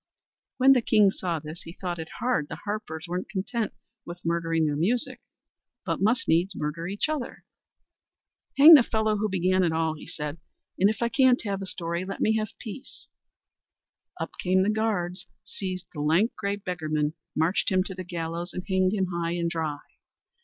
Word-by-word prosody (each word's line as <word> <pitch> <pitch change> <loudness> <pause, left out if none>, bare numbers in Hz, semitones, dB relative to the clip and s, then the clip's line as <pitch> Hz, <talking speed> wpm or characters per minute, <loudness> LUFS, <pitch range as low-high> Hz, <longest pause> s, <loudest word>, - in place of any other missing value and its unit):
When 265 +1 +7
the 250 - +3
king 210 -3 +4
saw 175 -3 -2
this, 155 +2 -8
he 165 - -10
thought 175 -2 -4
it 160 0 -6
hard 240 -12 0
the - - -7
harpers 190 -6 -4
weren't 180 +2 -4
content 210 +3 -2 0.3
with 175 0 -10
murdering 165 -1 +1
their 150 -1 0
music, 210 +11 -1 0.6
but 165 -1 -2
must 230 +6 +2
needs 175 +4 +2
murder 155 +3 -3
each 200 +8 0
other. 305 -5 -4 1.1
"Hang 300 +4 +11
the 295 - +10
fellow 220 -2 0
who 215 +1 0
began 185 0 +2
it 170 - +2
all," 160 0 0
said 150 +1 -5 0.4
he; - - -12
"and 195 - +6
if 220 +2 -2
I 235 - +1
can't 260 -1 +4
have 200 -2 -2
a 195 - -5
story, 170 -1 -3
let 195 +1 -6
me 220 - +2
have 215 -2 -4
peace." 230 +4 -10 1.1
Up - - -3
came 185 +1 +3
the 205 - +2
guards, 205 -5 -1 0.2
seized 185 -2 -5
the 150 - -4
lank, 165 +10 +2
grey 200 0 -2
beggarman, 155 -6 -2 0.2
marched 160 +5 +1
him 185 -2 +2
to 190 - -5
the 185 0 -6
gallows 170 0 -4
and 180 - -4
hanged 190 -1 +2
him 195 -3 +1
high 170 0 -1
and 170 -1 -1
dry. 160 -3 -2
185 Hz, 185 wpm, -26 LUFS, 165-215 Hz, 1.1 s, Hang